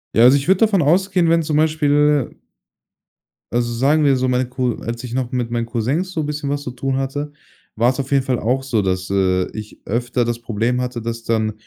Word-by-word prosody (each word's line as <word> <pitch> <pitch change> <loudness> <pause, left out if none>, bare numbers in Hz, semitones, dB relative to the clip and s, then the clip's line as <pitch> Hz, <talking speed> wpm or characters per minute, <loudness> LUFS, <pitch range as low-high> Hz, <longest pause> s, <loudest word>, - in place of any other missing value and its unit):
Ja, 115 - +6
also, 130 +3 +7
ich 140 - -4
würde 190 0 +4
davon 210 -5 +3
ausgehen, 180 +3 +2
wenn 165 0 +3
zum 150 -1 0
Beispiel 150 -2 +2 1.2
also, 120 0 0
sagen 145 +6 +2
wir 140 -2 +4
so, 130 0 0
meine 125 0 +1
Co 125 -2 -1
als 120 +1 -5
ich 120 - -6
noch 125 -1 -2
mit 120 -2 -2
meinen 115 -1 -1
Cousins 130 - -2
so 160 -4 -2
'n - - -2
bisschen 145 -1 -3
was 145 0 -2
zu 125 - -5
tun 135 +1 -2
hatte, 145 +2 -3 0.4
war's 125 +4 +1
auf 135 0 -4
jeden 135 -1 +3
Fall 130 -2 -1
auch 130 +4 0
so, 120 -5 0
dass, 95 -1 -2
äh, 95 -2 +1
ich 105 -1 -9
öfter 120 +2 -1
das 120 0 -2
Problem 120 +2 -1
hatte, 125 -1 -4
dass 115 0 -5
dann 110 -2 0
125 Hz, 220 wpm, -19 LUFS, 115-145 Hz, 1.2 s, also